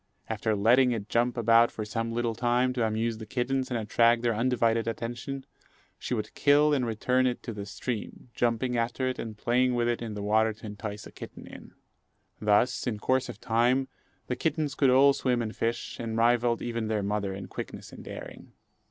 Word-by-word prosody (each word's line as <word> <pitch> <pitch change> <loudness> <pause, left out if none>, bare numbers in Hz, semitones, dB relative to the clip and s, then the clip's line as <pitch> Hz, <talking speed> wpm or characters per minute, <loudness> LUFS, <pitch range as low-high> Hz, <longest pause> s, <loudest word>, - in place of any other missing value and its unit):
After 110 0 -1
letting 120 +5 +4
it 110 -2 -5
jump 120 +1 +1
about 115 0 +5
for 110 - -5
some 115 +2 -3
little 115 0 -1
time, 125 +2 +1
to 125 -2 0
amuse 110 +1 -1
the 110 - -8
kittens 130 +3 -1
and 125 - -1
attract 115 +2 +3
their 120 -1 +2
undivided 115 -1 +1
attention, 120 +4 -4 0.5
she 125 - -2
would 105 -1 -4
kill 150 +1 +4
and 130 -4 +1
return 125 +3 +1
it 125 - -3
to 115 - -5
the 100 -1 -6
stream, 120 +3 -5
jumping 120 +1 0
after 120 +2 -1
it 130 - -3
and 110 -2 -6
playing 125 +3 +2
with 120 -1 +1
it 120 0 -1
in 110 -3 -5
the 105 - -5
water 110 +1 +2
to 105 - -13
entice 105 0 -6
a - - -11
kitten - - -10
in. - - -12 0.7
Thus, 105 +5 +2
in 110 -4 -1
course 130 +5 0
of - - -8
time, 125 +3 +2 0.4
the 125 - -2
kittens 150 +1 -1
could 140 -2 +3
all 135 +2 +6
swim 125 -3 0
and 110 -2 -3
fish, 115 +1 -2
and 115 -1 -3
rivalled 120 0 +2
even 115 -2 -2
their 110 -2 -1
mother 100 -1 -1
in 100 - -7
quickness - - -7
and - - -10
daring. - - -9
115 Hz, 200 wpm, -28 LUFS, 110-125 Hz, 0.7 s, all